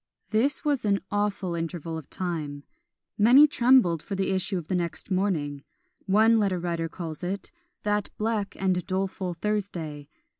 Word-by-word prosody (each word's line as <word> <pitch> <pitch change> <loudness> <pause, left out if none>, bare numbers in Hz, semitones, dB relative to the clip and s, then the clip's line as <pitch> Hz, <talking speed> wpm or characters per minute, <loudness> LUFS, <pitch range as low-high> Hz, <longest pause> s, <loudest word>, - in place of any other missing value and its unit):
This 260 +8 +1
was 285 -3 +1
an 200 -2 +2
awful 205 -3 -1
interval 165 -1 -4
of 160 -4 -7
time; 155 -6 -4 0.6
many 250 +8 +8
trembled 245 - +4
for 195 - -5
the 195 0 0
issue 190 +1 0
of 165 -3 -6
the 185 - -2
next 175 +2 -2
morning: 155 -7 0 0.4
one 220 +3 +5
letter 195 -3 +1
writer 170 -1 -2
calls 165 -1 -7
it 195 +3 -4 0.3
"that 210 0 0
black 215 -2 -1
and 185 -2 +1
doleful 185 -1 -2
Thursday!" 165 -7 -3
190 Hz, 150 wpm, -27 LUFS, 170-210 Hz, 0.6 s, many